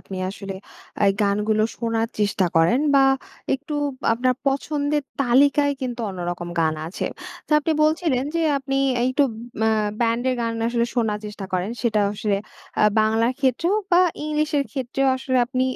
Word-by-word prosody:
আপনি 190 Hz, -, -8 dB
আসলে 195 Hz, -1 st, -7 dB, 0.5 s
আ -, -, +6 dB, 0.2 s
গানগুলো 210 Hz, +1 st, +1 dB, 0.2 s
শোনার 230 Hz, -1 st, -1 dB
চেষ্টা 200 Hz, -3 st, +1 dB
করেন 170 Hz, -, +4 dB
বা 275 Hz, -, +6 dB, 0.5 s
একটু 290 Hz, +3 st, -6 dB, 0.4 s
আপনার 250 Hz, +2 st, +1 dB
পছন্দের 290 Hz, +1 st, 0 dB, 0.2 s
তালিকায় 280 Hz, +3 st, +4 dB
কিন্তু 245 Hz, -2 st, -4 dB
অন্যরকম 175 Hz, -1 st, -4 dB
গান 160 Hz, -1 st, +2 dB
আছে। 175 Hz, -, -5 dB, 0.4 s
তো -, -, -26 dB
আপনি 315 Hz, +2 st, 0 dB
বলছিলেন 305 Hz, -4 st, +1 dB
যে, 335 Hz, -, +1 dB, 0.2 s
আপনি 270 Hz, 0 st, -3 dB, 0.2 s
আ -, -, 0 dB
একটু 285 Hz, +2 st, +3 dB, 0.4 s
মা 220 Hz, -, +4 dB, 0.3 s
ব্যান্ডের 240 Hz, +2 st, +1 dB
গান 230 Hz, -1 st, -1 dB, 0.2 s
আসলে 235 Hz, 0 st, +1 dB
শোনার 220 Hz, -4 st, 0 dB
চেষ্টা 210 Hz, -1 st, -7 dB
করেন 185 Hz, +3 st, -1 dB
সেটা 220 Hz, -3 st, +2 dB
আসলে 205 Hz, -1 st, -1 dB, 0.4 s
আ -, -, +4 dB, 0.2 s
বাংলার 225 Hz, +3 st, +2 dB
ক্ষেত্রেও 300 Hz, -, +1 dB, 0.2 s
বা 350 Hz, 0 st, +6 dB, 0.2 s
ইংলিশের 300 Hz, -1 st, 0 dB
ক্ষেত্রেও 270 Hz, 0 st, -1 dB
আসলে 260 Hz, 0 st, -1 dB
আপনি 255 Hz, +1 st, -1 dB
245 Hz, 150 wpm, -23 LUFS, 210-280 Hz, 0.5 s, আ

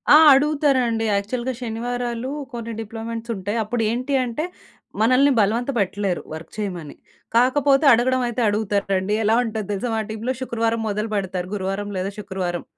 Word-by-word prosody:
ఆ! -, -, +11 dB, 0.2 s
అడుగుతారండి 270 Hz, -5 st, +2 dB
యాక్చువల్‌గా 240 Hz, +6 st, -1 dB
శనివారాలు 240 Hz, +1 st, -3 dB, 0.2 s
కొన్ని 230 Hz, -1 st, -5 dB
డిప్లొమెంట్సుంటయి. 225 Hz, -1 st, -4 dB
అప్పుడేంటి 240 Hz, +4 st, -1 dB
అంటే 245 Hz, +6 st, -3 dB, 0.6 s
మనల్ని 255 Hz, +5 st, +5 dB
బలవంత 230 Hz, +6 st, +1 dB
పెట్టలేరు 195 Hz, -1 st, -1 dB
వర్క్ 160 Hz, +1 st, -8 dB
చేయమని. 180 Hz, -8 st, -4 dB, 0.4 s
కాకపోతే 275 Hz, +4 st, +4 dB
అడగడం 255 Hz, +2 st, +2 dB
అయితే 240 Hz, +1 st, -2 dB
అడుగుతారండి. 205 Hz, -1 st, 0 dB
ఎలా 220 Hz, +2 st, +3 dB
ఉంటది 220 Hz, -3 st, -4 dB
తెలుసా 205 Hz, +5 st, -2 dB
మా -, -, 0 dB
టీమ్‌లో, 220 Hz, +4 st, -2 dB
శుక్రవారం 230 Hz, -2 st, -1 dB
మొదలు 210 Hz, +1 st, -2 dB
పెడతారు. 185 Hz, -2 st, -2 dB
గురువారం 195 Hz, +1 st, -3 dB
లేదా 185 Hz, +2 st, -2 dB
శుక్రవారం, 190 Hz, -3 st, -3 dB
225 Hz, 130 wpm, -22 LUFS, 200-245 Hz, 0.6 s, ఆ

